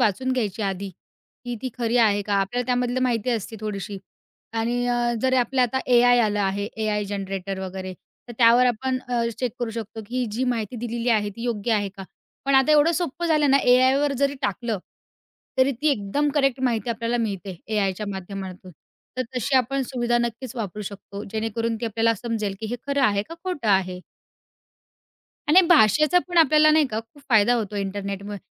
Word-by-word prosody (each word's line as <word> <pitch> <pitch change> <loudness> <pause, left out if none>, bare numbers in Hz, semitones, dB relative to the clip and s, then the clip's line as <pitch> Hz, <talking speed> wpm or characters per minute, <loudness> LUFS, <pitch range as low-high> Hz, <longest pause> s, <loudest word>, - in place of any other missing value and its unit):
वाचून 260 +6 +1
घ्यायची 220 -4 -2
आधी, 195 0 -2 0.6
की 245 0 -3
ती 260 - -2
खरी 235 0 0
आहे 210 -3 +4
का? 205 0 -2
आपल्याला 200 +5 0
त्यामधलं 250 0 0
माहिती 245 -1 0
असती 225 -1 -3
थोडीशी 200 -2 -5 0.5
आणि 240 +2 -1
अ, 240 0 +1
जरी 260 0 +3
आपल्याला 255 +1 +2
आता - - +3
एआय 245 0 +6
आलं 210 -2 +1
आहे 200 +1 -1
एआय 210 -1 0
जनरेटर 195 -1 -4
वगैरे 185 0 -5 0.4
तर - - -7
त्यावर 240 +1 +6
आपण 255 +2 0
अ, 240 -1 0 0.2
चेक 250 -4 -1
करू 240 -2 -2
शकतो, 225 0 -6
की 250 +2 -2
जी 245 +4 -1
माहिती 240 -2 -2
दिलेली 235 +1 -3
आहे 210 -3 +2
ती 230 - -7
योग्य 230 -1 -1
आहे 205 -2 +1
का. 195 0 -10 0.4
पण 275 0 +2
आता 270 +3 +5
एवढं 300 +3 +5
सोपं 345 0 -2
झालं 305 -3 +3
ना 275 - +6
एआयवर 260 +3 +4
जरी 280 0 +1
टाकलं 215 +1 -1 0.8
तरी 260 +1 +4
ती 285 +6 0
एकदम 275 +6 0
करेक्ट 275 -3 +2
माहिती 235 -2 0
आपल्याला 230 +1 -1
मिळते 195 -5 -3
एआयच्या 210 -1 -1
माध्यमातून. 190 -1 -7 0.5
तर 255 - 0
तशी 265 +3 -1
आपण 270 +2 +1
सुविधा 240 -2 -1
नक्कीच 240 +2 -3
वापरू 210 -2 -4
शकतो, 200 0 -8
जेणेकरून 225 +1 -2
ती - - -2
आपल्याला 225 +1 +1
समजेल, 215 -2 -3
की 220 - -3
हे 245 - -2
खरं 280 -1 0
आहे 205 -4 +3
का 330 - -7
खोटं 350 - -2
आहे. 185 -2 +1 1.5
आणि 360 +5 +8
भाषेचा 305 - +5
पण 350 - +1
आपल्याला 310 -1 +6
नाही 305 -2 +4
का 220 -3 -3
खूप 230 +6 -20
फायदा 225 +1 +5
होतो 215 -3 -2
इंटरनेटमुळे. 200 +1 -4
230 Hz, 180 wpm, -24 LUFS, 205-255 Hz, 1.5 s, आणि